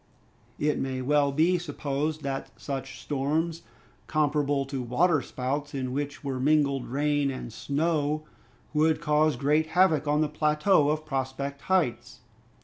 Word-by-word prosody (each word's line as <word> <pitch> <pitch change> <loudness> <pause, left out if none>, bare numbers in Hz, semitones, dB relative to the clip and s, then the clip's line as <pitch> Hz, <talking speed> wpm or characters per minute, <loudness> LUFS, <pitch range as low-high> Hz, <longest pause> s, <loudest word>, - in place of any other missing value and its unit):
It 150 0 0
may 130 -1 -2
well 145 +1 +3
be 165 +5 +3
supposed 150 -1 -3
that 135 -1 -5
such 135 -2 -5
storms, 155 +4 -1 0.5
comparable 145 -2 +1
to 135 -1 -4
water 145 +6 +2
spouts 140 +4 -3
in 130 -2 -3
which 145 +1 -4
were 135 -2 -3
mingled 140 -1 +2
rain 145 +1 +1
and 130 -4 -6
snow, 150 +1 0 0.5
would 155 +1 +3
cause 150 0 +2
great 150 +5 +2
havoc 160 -6 +4
on 150 +1 +2
the 155 - +2
plateau 150 +2 +2
of 155 +1 -1
Prospect 135 0 -3
Heights. 180 -10 0
145 Hz, 140 wpm, -27 LUFS, 135-155 Hz, 0.5 s, havoc